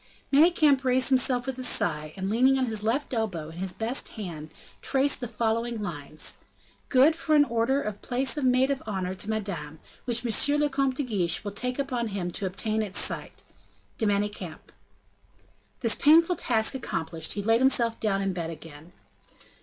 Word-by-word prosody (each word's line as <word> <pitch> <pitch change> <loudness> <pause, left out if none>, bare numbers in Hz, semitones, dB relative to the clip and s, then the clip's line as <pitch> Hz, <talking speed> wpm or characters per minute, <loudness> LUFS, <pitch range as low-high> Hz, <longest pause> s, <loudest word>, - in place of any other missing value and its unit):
Manicamp 300 -3 +5
raised 255 0 +3
himself 255 -1 +3
with 265 -1 -4
a - - -3
sigh, 155 -10 0
and 190 0 -3
leaning 255 +6 +3
on 260 - +2
his 220 -3 -2
left 250 +7 -1
elbow, 190 -10 -2
in 165 - -10
his 190 0 -2
best 225 +7 -2
hand, 160 -7 -7 0.3
traced 275 +1 +1
the 245 - -4
following 230 +1 -1
lines: 155 -6 -4 0.5
"Good 275 +4 +5
for 310 -1 +1
an 290 -1 +6
order 240 +3 0
for - - -5
a - - -6
place 255 +7 -2
of 295 - -3
maid 255 +1 +3
of 275 - -2
honor 190 -3 -2
to 195 +3 -6
Madame, 175 -9 -4 0.3
which 240 0 -2
M. 285 +6 +4
le 295 0 +2
Comte 270 -1 0
de 285 - -1
Guiche 195 -10 -1
will 205 - -4
take 250 +5 -3
upon 255 -4 -2
him 190 -4 -3
to 195 +2 -2
obtain 215 +4 -1
at 200 -3 -5
sight. - - -3 0.6
DE 220 - +1
MANICAMP." 200 -5 -3 1.1
This 230 -2 +3
painful 330 +4 +5
task 220 -1 +1
accomplished, 165 -10 -3
he 205 - -4
laid 225 +3 +3
himself 235 -4 +2
down 195 -2 0
in 195 -1 -1
bed 170 -2 -4
again. 160 +1 -11
225 Hz, 185 wpm, -27 LUFS, 190-260 Hz, 1.1 s, an